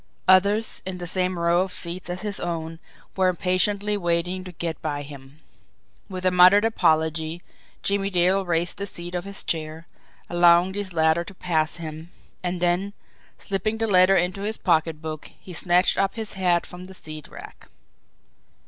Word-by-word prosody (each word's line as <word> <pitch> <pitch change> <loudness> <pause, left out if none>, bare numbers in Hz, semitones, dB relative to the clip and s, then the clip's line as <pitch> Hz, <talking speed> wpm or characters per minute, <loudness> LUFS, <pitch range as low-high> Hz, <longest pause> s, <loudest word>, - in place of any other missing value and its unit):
Others, 200 +4 +4
in 185 -1 -5
the 175 - -6
same 185 +1 -1
row 170 +1 +2
of 190 0 -2
seats 175 +1 -2
as 180 +2 -4
his 205 -2 -3
own, 165 -1 -4 0.4
were 190 -1 +2
impatiently 185 +3 +1
waiting 175 0 -1
to 185 - -9
get 165 -2 -5
by 145 -2 -3
him. 140 +1 -13 0.7
With 185 -1 -6
a 185 - +4
muttered 185 +4 +6
apology, 160 -4 +1 0.4
Jimmie 200 0 0
Dale 185 +1 +2
raised 170 0 -1
the 200 - -2
seat 175 -2 -6
of 180 0 -3
his 200 0 -3
chair, 160 0 -4 0.4
allowing 175 +1 +4
these 200 -1 -3
latter 160 0 +2
to 190 +3 -12
pass 160 -4 0
him 160 0 -8 0.3
and 180 0 -3
then, 180 +3 0 0.4
slipping 205 +3 -2
the 225 0 0
letter 185 -1 +5
into 180 +2 0
his 215 +2 -3
pocketbook, 160 -3 -1
he 185 - -11
snatched 175 +2 +2
up 195 - +1
his 220 -2 -5
hat 180 -3 +1
from 180 +1 -10
the 190 - -12
seat 155 -3 -8
rack. - - -13
180 Hz, 165 wpm, -24 LUFS, 165-190 Hz, 0.7 s, muttered